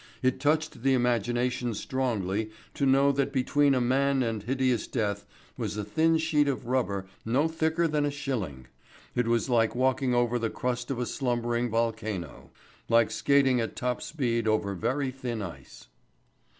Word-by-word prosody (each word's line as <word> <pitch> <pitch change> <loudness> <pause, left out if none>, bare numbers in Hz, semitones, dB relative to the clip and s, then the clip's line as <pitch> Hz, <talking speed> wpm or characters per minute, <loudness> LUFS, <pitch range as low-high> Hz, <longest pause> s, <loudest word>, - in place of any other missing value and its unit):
It 130 0 +2
touched 155 -1 0
the 135 +1 +3
imagination 120 0 0
strongly 110 -5 -1 0.2
to 140 - 0
know 135 +1 +5
that 140 0 0
between 140 +1 +2
a - - +2
man 135 +2 +2
and 115 -3 -2
hideous 130 +1 0
death 100 -3 -2 0.3
was - - -3
a 105 - -2
thin 160 +9 +2
sheet 160 -2 +2
of 135 -3 -2
rubber 110 -6 -1 0.2
no 130 +8 +2
thicker 160 +1 +1
than 150 -2 0
a - - +1
shilling. 115 - -4 0.5
It 125 -1 0
was 115 +1 +1
like 115 -3 +2
walking 130 0 +1
over 120 0 +2
the 115 -1 -1
crust 125 0 -3
of 135 - -2
a 125 - -1
slumbering 120 -2 -1
volcano; 110 -6 -3 0.4
like 115 -2 +4
skating 135 -2 +3
at 115 - -4
top 125 -1 -2
speed 120 -7 -1
over 110 -2 +1
very 130 +7 -1
thin 125 -4 -4
ice. 90 -4 -10
125 Hz, 165 wpm, -28 LUFS, 115-135 Hz, 0.5 s, know